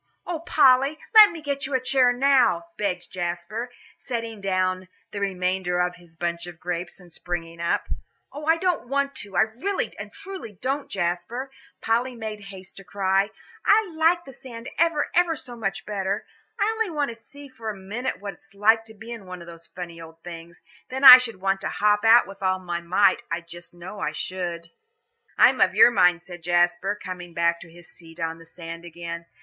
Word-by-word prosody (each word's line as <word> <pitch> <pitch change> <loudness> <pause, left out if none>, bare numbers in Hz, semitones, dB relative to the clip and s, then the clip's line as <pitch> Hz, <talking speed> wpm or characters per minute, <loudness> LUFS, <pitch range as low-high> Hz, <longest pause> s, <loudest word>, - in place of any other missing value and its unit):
"Oh, 345 -2 -3
Polly, 275 -2 +4 0.2
let 430 -2 +10
me 330 -4 -9
get 280 -2 -2
you 275 - -2
a - - +3
chair 255 0 +3
now," 250 -9 +3
begged 185 -3 -3
Jasper, 175 +7 -4 0.3
setting 230 -4 -5
down 185 -1 0 0.2
the 205 - -5
remainder 185 -2 -1
of 180 0 0
his 170 -1 -19
bunch 170 +1 -3
of 175 -2 -10
grapes, 175 0 -4
and 175 -2 -16
springing 170 -1 -5
up. 170 - 0 0.5
"Oh, 295 +2 -7
I 325 +1 +4
don't 350 -7 -1
want 280 +1 0
to, 200 -2 -8
I - - +6
really 255 - -2
and - - -7
truly 390 - -8
don't, 275 +2 -2
Jasper," 180 +9 -3 0.3
Polly 240 +3 0
made 220 -2 -6
haste 190 -1 -10
to 195 - -10
cry. 195 +1 +1 0.3
"I 420 -2 +4
like 330 +2 +2
the 270 - -11
sand 235 -2 -9
ever 330 -2 +3
and - - -4
ever 345 -1 +3
so 250 -5 -7
much 195 -4 -3
better. 200 -1 -2 0.3
I 405 - +3
only 445 -2 -1
want 295 -4 -1
to 230 - -7
see 280 +5 -14
for 230 -4 -7
a 210 - -5
minute 205 +3 -4
what 200 0 -6
it's 195 +3 -22
like 220 +3 +4
to 220 0 -15
be 220 +3 -10
in 225 -5 -8
one 180 0 -7
of 170 - -11
those 170 -1 -12
funny 170 -2 -8
old 165 0 -13
things. 170 0 -10 0.3
Then 265 +2 -4
I 255 -1 +13
should 230 -6 -5
want 195 0 0
to - - -2
hop 210 0 +2
out 230 +2 +7
with 195 0 -12
all 185 -1 +1
my 175 -2 -4
might, 185 +3 +3
I 170 0 -2
just 170 +1 -13
know 175 +4 -10
I 155 - -2
should." 170 0 -5 0.7
"I'm - - +5
of - - +4
your 245 - +8
mind," 180 -4 +3
said 175 -2 -10
Jasper, 175 +3 +1
coming 180 -2 -8
back 170 0 +1
to 175 - -12
his 175 0 -15
seat 165 0 -15
on 165 -1 -3
the 165 - -15
sand 165 0 -9
again. 170 0 -7
195 Hz, 205 wpm, -24 LUFS, 175-255 Hz, 0.7 s, I